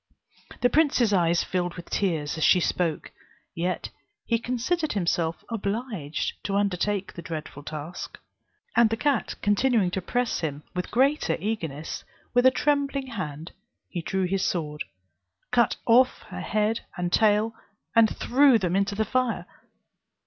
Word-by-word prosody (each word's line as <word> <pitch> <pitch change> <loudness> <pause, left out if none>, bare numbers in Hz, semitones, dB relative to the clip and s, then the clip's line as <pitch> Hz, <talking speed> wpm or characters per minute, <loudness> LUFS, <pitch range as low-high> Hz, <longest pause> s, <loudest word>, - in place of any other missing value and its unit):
The 245 - +4
prince's 270 -8 +3
eyes 170 -2 +3
filled 180 -1 -2
with 175 - -10
tears 160 -7 0
as 160 - -2
she 180 - +6
spoke, 170 -2 -1 0.4
yet 180 +2 -2 0.3
he 230 -1 +1
considered 255 +8 -1
himself 170 -4 0
obliged 205 - -3
to 195 - -1
undertake 200 0 0
the 170 - -7
dreadful 155 -3 -6
task, 155 +3 -7 0.6
and 235 -2 +6
the 225 - -1
cat 280 -1 0
continuing 205 -2 +3
to 190 - -2
press 245 +6 -1
him 150 -3 -3
with 180 0 -3
greater 275 +5 +2
eagerness, 165 -8 -4 0.3
with 245 +1 +5
a - - +10
trembling 275 -1 0
hand 155 -5 -5 0.4
he 175 - -4
drew 190 +3 -1
his 190 +1 0
sword, 150 -4 -2 0.7
cut 240 -3 +3
off 250 +2 +4
her - - -6
head 215 +1 0 0.2
and 175 0 -2
tail, 215 +1 +3 0.4
and 225 -1 +5
threw 265 0 +5
them 180 -4 -1
into 200 +1 +1
the 220 +1 +1
fire. 255 +1 0
200 Hz, 145 wpm, -26 LUFS, 175-240 Hz, 0.7 s, a